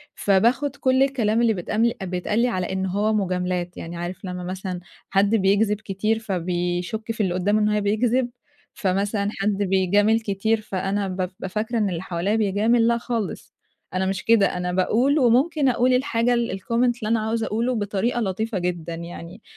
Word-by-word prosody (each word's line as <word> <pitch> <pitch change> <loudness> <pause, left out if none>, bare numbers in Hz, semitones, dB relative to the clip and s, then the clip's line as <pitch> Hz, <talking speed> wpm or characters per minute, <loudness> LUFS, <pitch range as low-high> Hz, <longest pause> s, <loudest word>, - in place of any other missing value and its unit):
فباخُد 235 +8 +2
كل 260 -1 +3
الكلام 235 -5 +1
اللي 230 -2 +3
بيتقامل 215 +5 0
بيتقال 185 +4 -1
لي 245 - +3
على 185 -5 -2
إن 190 0 -1
هو 205 +3 0
مُجاملات. 180 -3 -1
يعني 170 +1 -7
عارف 175 +3 -6
لمّا 180 -1 -5
مثلًا 185 0 -4 0.3
حد 200 +3 +3
بيكذب 205 +1 +2
كتير، 215 +2 -1
فبيشُك 180 +2 -2
في 220 -2 -1
اللي 180 -2 0
قدامه 205 +4 +1
إن 210 - +2
هو 210 0 +1
بيكذب. 235 +5 +1 0.4
فمثلًا 200 0 0
حد 200 -1 -1
بيجامل 200 +3 +3
كتير، 220 +1 0
فأنا 195 0 -2
بابقى 185 0 -4
فاكرة 220 +4 -2
إن 210 -3 +1
اللي 170 -2 -3
حواليّا 190 +3 -1
بيجامل، 220 +3 +2
لأ 235 0 +3
خالص. 230 -3 -4 0.4
أنا 185 +1 0
مش 190 0 -2
كده، 210 -5 +3
أنا 180 0 -2
باقول 240 +11 +2
وممكن 270 +4 +3
أقول 255 +1 +2
الحاجة 245 -2 +1
ال 235 -1 0
الcomment 210 - -14 0.3
اللي 220 - -5
أنا 230 - +2
عاوزة 220 +1 -1
أقوله 235 +4 0
بطريقة 210 +3 -1
لطيفة 215 +2 -2
جدًا. 170 -2 -3
يعني 170 +3 -9
205 Hz, 170 wpm, -23 LUFS, 185-230 Hz, 0.4 s, كل